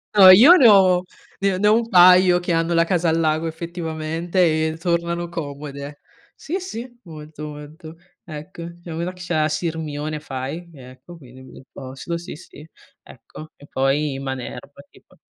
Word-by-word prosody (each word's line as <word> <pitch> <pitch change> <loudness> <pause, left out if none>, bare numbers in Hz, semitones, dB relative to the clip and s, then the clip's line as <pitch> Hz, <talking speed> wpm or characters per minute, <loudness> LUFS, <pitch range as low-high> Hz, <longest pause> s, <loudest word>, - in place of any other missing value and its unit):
No, 195 -2 +9
io 245 - +8
ne 270 -9 +6
ho 185 -4 +5 0.4
ne 195 -1 0
ne 210 - +2
ho 210 - +5
un 230 0 -1
paio 180 -2 +6
che 175 0 -4
hanno 165 +1 0
la 165 0 +3
casa 170 -1 0
al 160 +1 +1
lago 155 0 0
effettivamente 165 +1 -4 0.3
e 160 - -9
tornano 170 0 -2
comode. 145 -3 -8 0.4
Sì, 350 +5 -5
sì, 245 - -9
molto, 155 -2 -10
molto. 150 +2 -11 0.3
Ecco. 170 0 -10
Ce 175 - -22
n'è - - -5
uno 170 +2 -4
che 180 - -15
ce 180 -1 -5
l'ha 155 -1 +1
a 155 - 0
Sirmione 155 -2 -4
fai, 145 +4 -7
ecco, 130 +4 -14
quindi 130 -3 -15
bel 130 - -15
posto. 135 +5 -7
Sì, 170 - -9
sì, 150 -1 -15 0.4
ecco. 155 0 -14
E 145 - -17
poi 135 +1 -1
Manerba 130 -2 -7
tipo. - - -24
165 Hz, 170 wpm, -21 LUFS, 150-180 Hz, 0.4 s, No